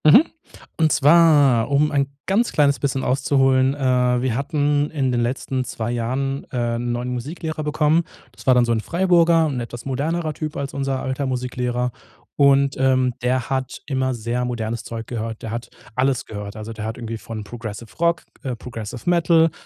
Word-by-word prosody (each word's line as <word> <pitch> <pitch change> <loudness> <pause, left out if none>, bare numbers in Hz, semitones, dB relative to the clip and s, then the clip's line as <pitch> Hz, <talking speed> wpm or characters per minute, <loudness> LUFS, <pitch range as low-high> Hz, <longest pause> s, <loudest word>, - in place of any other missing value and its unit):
Mhm. 155 - +8 0.5
Und 160 -2 +3
zwar, 145 -6 +5
um 145 +2 +3
ein 140 -1 +1 0.2
ganz 220 +5 +1
kleines 140 -2 +3
bisschen 135 -1 -1
auszuholen, 135 0 +2
äh, 125 -3 +2
wir 125 -3 0
hatten 145 +1 +1
in 135 -4 0
den 120 -1 +1
letzten 130 +2 -1
2 120 -2 -4
Jahren, 130 +4 -2
äh, 120 -2 -1
'n 120 +1 -2
neuen 120 +1 -2
Musiklehrer 155 +5 -4
bekommen. 155 +2 +2 0.3
Das - - -16
war 130 - +6
dann 125 -1 +4
so 120 - 0
'n 115 -1 +1
Freiburger, 170 0 +3
'n 135 -4 -2
etwas 120 0 -7
modernerer 155 +4 -1
Typ 155 0 -5
als 140 -1 -4
unser 135 -1 -2
alter 130 +2 -2
Musiklehrer. 125 -1 -2 0.4
Und, 140 -1 +4
ähm, 130 -1 +3
der 125 0 0
hat 130 -2 -2
immer 130 -2 0
sehr 120 +2 -2
modernes 115 -1 -3
Zeug 115 0 -6
gehört. 115 -1 -5
Der 110 - -4
hat 115 0 -5 0.3
alles 130 0 +1
gehört. 105 -1 -7
Also, 110 +1 -7
der 110 -1 -6
hat 110 +1 -4
irgendwie 115 -1 -5
von 110 -1 -7
progressive 110 0 -8
Rock, 170 0 +2 0.2
äh, 130 -2 -3
progressive 115 +1 -8
Metal, 165 -2 +4
130 Hz, 180 wpm, -22 LUFS, 120-145 Hz, 0.5 s, Mhm